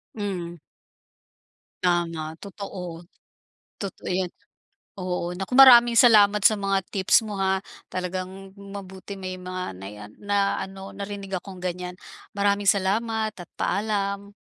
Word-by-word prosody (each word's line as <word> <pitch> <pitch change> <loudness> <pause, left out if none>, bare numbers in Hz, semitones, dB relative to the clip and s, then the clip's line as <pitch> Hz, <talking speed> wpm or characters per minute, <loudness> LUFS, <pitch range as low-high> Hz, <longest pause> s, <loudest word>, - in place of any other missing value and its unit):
Hmm. 185 -5 -4 1.3
Tama, 165 -3 0
totoo. 180 -4 -7 0.8
Totoo 195 -2 -6
'yan. 185 0 +1 0.7
Oo, 180 -1 -2
naku, 195 +7 -4
maraming 240 -3 +9
salamat 210 -4 +6
sa 215 -1 +5
mga 195 -1 +1
tips 195 +3 +4
mo, 210 -2 -5
ha. 190 0 +1 0.2
Talagang 185 +1 -5
mabuti 200 -1 -9
may 185 -1 -6
mga 185 - -5
nai-a 105 +2 -8
na 200 -1 +1
ano 195 0 -7
narinig 200 -1 -7
akong 185 -1 -11
ganiyan. 180 0 -4 0.4
Maraming 200 0 +1
salamat 215 +3 +2
at 175 - -8
paalam. 200 0 -1
195 Hz, 115 wpm, -25 LUFS, 180-205 Hz, 1.3 s, maraming